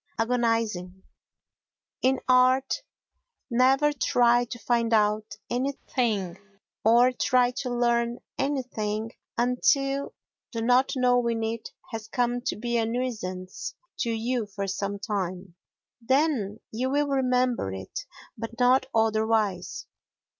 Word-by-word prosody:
Agonising 225 -6 0 1.0
In 260 +1 +2
art, 255 - +4 0.7
never 265 +5 +4
try 245 -2 +3
to 240 - -7
find 235 -1 0
out 210 -1 +2
anything, 240 -7 -1 0.4
or 240 +3 +6
try 250 0 +2
to 255 - -2
learn 240 0 +1 0.2
anything 225 -6 -2 0.3
until 275 +3 +1 0.4
the 230 - -2
not 250 +3 +3
knowing 245 -3 +2
it 225 0 -3 0.2
has 220 -1 -5
come 245 +1 0
to - - 0
be 235 +2 -1
a 225 - +2
nuisance 215 -7 -4 0.2
to 235 - 0
you 230 0 -1
for 200 0 -4
some 200 +1 -3
time. 190 -3 -4 0.5
Then 250 -5 +1
you 250 +4 -1
will 290 +2 +2
remember 255 - +1
it, 95 0 -6 0.3
but 230 +1 -7
not 255 +1 +4
otherwise. 220 -3 +1
235 Hz, 110 wpm, -27 LUFS, 215-255 Hz, 1.0 s, or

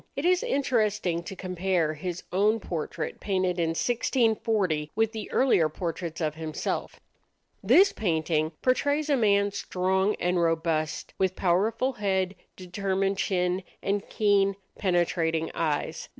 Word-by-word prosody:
It 280 - -3
is 365 0 +4
interesting 215 - 0
to 195 - -6
compare 180 -3 -1
his 175 +3 -5
own 210 +4 +2
portrait 165 -3 -4
painted 185 -3 0
in 165 -1 0
1640 220 - +1
with 225 0 +2
the 220 -2 -6
earlier 210 -12 +3
portraits 165 0 -4
of 155 -3 -1
himself. 155 0 -4 0.6
This 395 +2 +6
painting 160 -4 0
portrays 285 +4 +1
a - - +5
man 200 -4 +3
strong 190 0 0
and 180 0 +1
robust, 165 -2 -1
with 190 -1 +1
powerful 215 +8 +1
head, 190 -4 0 0.2
determined 195 +1 -2
chin, 180 -1 0 0.2
and 200 +1 0
keen, 200 -2 +2 0.2
penetrating 170 -3 0
eyes. 155 -3 -2
190 Hz, 125 wpm, -27 LUFS, 165-210 Hz, 0.6 s, This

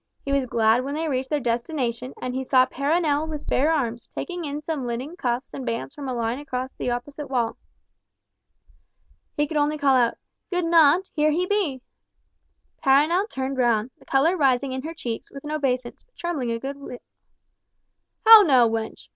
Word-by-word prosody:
He 275 - -2
was 275 -2 +1
glad 225 +1 +2
when 280 +2 -4
they 320 +1 -2
reached 260 -2 -2
their 300 - 0
destination, 245 0 -2
and 250 - -4
he 260 +1 -2
saw 255 -1 +4
Perronel 300 +2 0
with 300 -2 -6
bare 295 +5 +2
arms, 240 -7 -2
taking 355 -2 -5
in 295 +1 -5
some 295 -5 -3
linen 255 +8 -4
cuffs 245 -5 -3
and 270 - -6
bands 230 +2 -4
from 280 -3 -6
a - - -2
line 235 +2 -2
across 260 -2 -4
to - - -41
the - - -1
opposite 280 +4 -5
wall. 240 -4 0 1.8
He 295 - +2
could 300 +1 -3
only 295 +1 +1
call 280 -2 +3
out, 240 -2 +2 0.3
"Good 355 -2 -1
naunt, 330 +2 +4
here 305 -1 +3
he 340 +4 +1
be!" 365 -11 -1 1.0
Perronel 310 +10 +3
turned 265 -2 -3
round, 235 -1 +2
the - - -20
colour 290 +7 +2
rising 270 -4 +2
in 260 0 -3
her 320 +4 -7
cheeks, 235 -8 -5
with 275 - -10
an 300 - -6
obeisance, 255 -5 -2
but - - -44
trembling 310 -8 -3
a 230 - -1
good 275 +4 -6
deal. 275 -3 -8 1.3
"How 445 -1 +11
now, 260 - +5
wench? 225 0 -4
275 Hz, 190 wpm, -24 LUFS, 250-305 Hz, 1.8 s, How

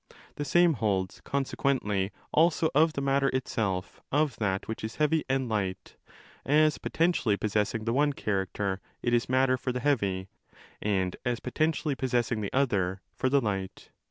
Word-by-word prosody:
The 145 - -2
same 175 +4 +4
holds, 100 -6 -1
consequently, 130 -8 0 0.2
also 160 0 +3
of 155 +3 +4
the 140 - -3
matter 135 0 +2
itself 110 -8 -2
of 145 -3 +2
that 100 -3 -1
which 110 - -5
is 110 +1 -4
heavy 155 +1 +2
and 135 -1 +1
light: 100 -4 -3 0.5
as 155 +2 +3
potentially 160 - +1
possessing 110 +1 -1
the 115 - 0
one 145 +2 +2
character, 95 -3 -2 0.2
it 120 - +1
is 120 0 +2
matter 130 0 +3
for 130 - -2
the 125 - -2
heavy, 100 -9 0 0.5
and 95 -3 0
as 120 -2 -1
potentially 155 +3 0
possessing 120 -4 0
the 100 - -3
other, 95 -9 +1
for 130 - 0
the 140 +1 +3
light. 95 -4 -4
120 Hz, 155 wpm, -28 LUFS, 100-140 Hz, 0.5 s, same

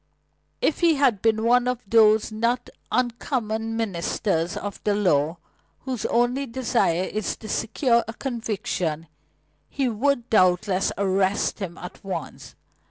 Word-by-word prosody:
If 315 - +1
he 335 -2 +4
had 255 -8 +2
been 220 -1 +2
one 245 +1 +3
of 250 -1 -2
those 220 0 +4
not 235 +3 -1 0.2
uncommon 225 -2 -1
ministers 180 -4 -1
of 205 -1 -6
the 205 -1 +1
law, 165 -5 +2 0.4
whose 255 -4 -3
only 245 +4 +1
desire 230 -8 +1
is 215 +2 -3
to 220 - -10
secure 235 +3 +1
a 225 - -5
conviction, 205 - -3 0.6
he 270 -2 -1
would 240 +2 0
doubtless 185 -1 +3
arrest 195 +1 +1
him 185 -4 -5
at 180 - -10
once. 195 -1 -6
220 Hz, 130 wpm, -24 LUFS, 195-245 Hz, 0.6 s, he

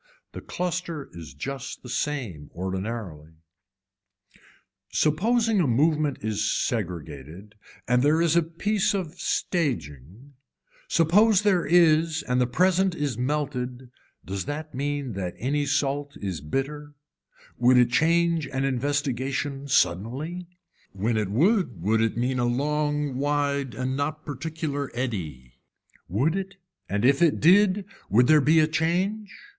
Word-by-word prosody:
The - - -8
cluster 175 -4 -4
is 80 -6 -10
just 135 - -6
the - - -9
same 120 - -3
ordinarily. 95 -4 -5 1.6
Supposing 220 +8 +2
a 160 - +2
movement 150 +3 +2
is 110 0 -1
segregated 85 - -4 0.3
and 125 0 +3
there 150 +4 +3
is 170 -1 +2
a 170 - +5
piece 195 +6 0
of 180 -3 -4
staging, 120 - -3 0.5
suppose 195 +5 +4
there 190 -5 +2
is 160 -2 +4
and 125 0 +1
the 125 - +2
present 185 +6 +2
is 145 -6 -2
melted 125 -1 -3 0.3
does 95 0 -4
that 155 +2 -5
mean 140 -1 -3
that 90 -2 -4
any 145 +3 -1
salt 140 0 -1
is 95 -7 -4
bitter, 145 - -4 0.6
would 125 +1 +5
it 120 -1 +4
change 165 +2 +2
an 135 0 -2
investigation 135 +1 -2
suddenly, 135 - 0 0.5
when 105 +4 -1
it 105 -3 0
would 160 - +2
would 110 +6 +1
it 115 0 0
mean 125 +1 0
a 120 - +1
long 145 +2 -1
wide 140 -2 -1
and 130 +1 -2
not 155 +2 -3
particular 145 0 -4
eddy. 80 - -5 0.5
Would 130 - +1
it 195 0 -4 0.3
and 100 +4 0
if 140 +3 +4
it 165 -3 +3
did 195 +3 +4 0.2
would 120 +5 +5
there 155 +2 +5
be 155 +4 +4
a 155 - +4
change. 180 +7 -1
140 Hz, 130 wpm, -25 LUFS, 120-160 Hz, 1.6 s, a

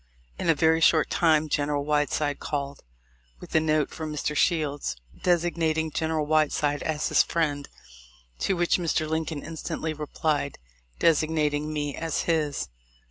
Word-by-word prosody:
In - - -1
a 165 - +5
very 160 +2 +3
short 160 -1 +4
time 155 -2 +3
General 145 -1 0
Whiteside 145 0 0
called 140 -1 -4 0.6
with - - -11
a 160 - +5
note 155 -2 +1
from 155 -1 -5
Mr. 150 0 -2
Shields, 145 - +1 0.3
designating 165 -2 +1
General 160 0 -1
White 155 0 +3
side 145 -1 0
as 155 -1 -1
his - - +5
friend, 145 -4 -1 0.7
to 195 - +1
which 175 +1 +2
Mr. 160 -2 0
Lincoln 160 -1 -2
instantly 160 0 -4
replied 150 -1 -2 0.4
designating 155 -2 +1
me 145 -2 -2
as 165 -2 -2
his. 155 - 0
155 Hz, 140 wpm, -26 LUFS, 145-160 Hz, 0.7 s, a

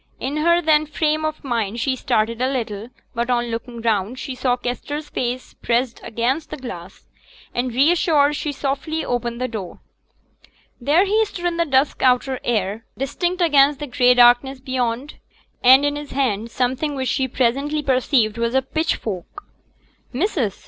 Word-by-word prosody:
In 280 +3 -3
her 340 +3 +3
then 310 -1 +3
frame 310 +1 0
of 310 0 -3
mind 230 -4 -2
she 260 +2 0
started 230 -1 0
a 260 +1 +1
little; 225 -4 -4 0.2
but 235 +1 -2
on 240 -1 0
looking 235 +1 -5
round, 220 +1 0
she 265 0 -5
saw 250 -1 0
Kester's 290 +5 -4
face 250 +1 -3
pressed 240 0 -1
against 255 +7 -1
the - - -6
glass, 190 - -9 0.5
and, 245 +1 -1
reassured, 295 +2 +3
she 295 0 -2
softly 285 +3 -3
opened 240 -1 -2
the 255 - -1
door. 210 -7 -7 1.0
There 300 +9 +3
he 430 +3 +3
stood 355 -4 -7
in 345 -1 0
the 335 - +2
dusk 270 +1 +1
outer 255 0 +2
air, 215 -1 -1
distinct 345 +7 -1
against 285 -3 +4
the 295 - -4
gray 250 -2 +3
darkness 245 +2 +5
beyond, 255 +1 -3 0.4
and 260 +3 +7
in 290 0 0
his 295 0 -7
hand 235 -5 0
something 260 +5 -1
which 260 -1 -2
she 265 -1 0
presently 275 +5 0
perceived 255 -4 +1
was 235 +2 0
a 265 - +3
pitchfork. 265 - -3 0.7
'Missus!' 265 - -1
260 Hz, 160 wpm, -21 LUFS, 235-295 Hz, 1.0 s, and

